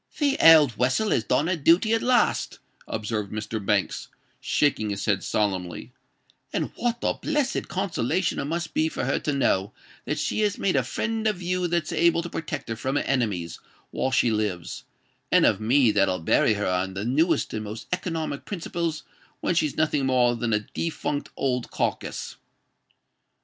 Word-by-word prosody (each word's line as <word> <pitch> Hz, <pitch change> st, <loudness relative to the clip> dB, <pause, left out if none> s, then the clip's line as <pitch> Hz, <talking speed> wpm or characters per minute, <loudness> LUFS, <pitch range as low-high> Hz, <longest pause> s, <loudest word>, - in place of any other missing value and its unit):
"The 285 Hz, -2 st, +2 dB
old 150 Hz, -8 st, +7 dB
wessel 135 Hz, -, +1 dB
has 110 Hz, -, +2 dB
done 145 Hz, -, +1 dB
her 180 Hz, +2 st, +1 dB
dooty 170 Hz, +8 st, +3 dB
at 225 Hz, -, +2 dB
last," 250 Hz, -1 st, +1 dB, 0.3 s
observed 105 Hz, -2 st, -3 dB
Mr. 110 Hz, 0 st, -4 dB
Banks, 100 Hz, 0 st, 0 dB, 0.3 s
shaking 125 Hz, -8 st, +1 dB
his 100 Hz, -1 st, -3 dB
head 100 Hz, -3 st, +1 dB
solemnly; 95 Hz, -4 st, -2 dB, 0.6 s
"and -, -, -2 dB
what 240 Hz, -1 st, -1 dB
a -, -, +2 dB
blessed 295 Hz, -4 st, -1 dB
consolation 180 Hz, -3 st, -1 dB
it -, -, -2 dB
must 170 Hz, +2 st, -3 dB
be 160 Hz, +1 st, +1 dB
for -, -, -3 dB
her -, -, 0 dB
to 150 Hz, -, -2 dB
know 105 Hz, -7 st, +1 dB, 0.3 s
that -, -, -2 dB
she -, -, -1 dB
has 210 Hz, -1 st, +1 dB
made 190 Hz, -, 0 dB
a -, -, +4 dB
friend 220 Hz, 0 st, -2 dB
of 210 Hz, -4 st, 0 dB
you 180 Hz, 0 st, 0 dB
that's 170 Hz, -2 st, -1 dB
able 170 Hz, 0 st, +3 dB
to 170 Hz, -, -7 dB
protect 150 Hz, -4 st, -5 dB
her 115 Hz, -, -2 dB
from 130 Hz, +5 st, -3 dB
her -, -, +1 dB
enemies 105 Hz, -11 st, -1 dB, 0.3 s
while 130 Hz, -, -1 dB
she 125 Hz, -3 st, +2 dB
lives, 105 Hz, -6 st, -3 dB, 0.5 s
and -, -, +5 dB
of 100 Hz, -, +2 dB
me 120 Hz, +1 st, +4 dB
that'll 95 Hz, -2 st, +2 dB
bury 100 Hz, +6 st, +2 dB
her 105 Hz, -, -2 dB
on 90 Hz, +1 st, -1 dB
the 100 Hz, +2 st, -3 dB
newest 155 Hz, +8 st, +1 dB
and 110 Hz, 0 st, -3 dB
most 110 Hz, +2 st, -7 dB
economic 165 Hz, -5 st, -3 dB
principles 170 Hz, -4 st, -3 dB, 0.4 s
when -, -, 0 dB
she's 155 Hz, -4 st, 0 dB
nothing 150 Hz, -3 st, +1 dB
more 125 Hz, -2 st, +3 dB
than 120 Hz, 0 st, -2 dB
a 105 Hz, -1 st, +2 dB
defunct 150 Hz, -3 st, -3 dB
old 125 Hz, -3 st, -1 dB
carkiss." -, -, -3 dB
140 Hz, 175 wpm, -25 LUFS, 110-170 Hz, 0.6 s, old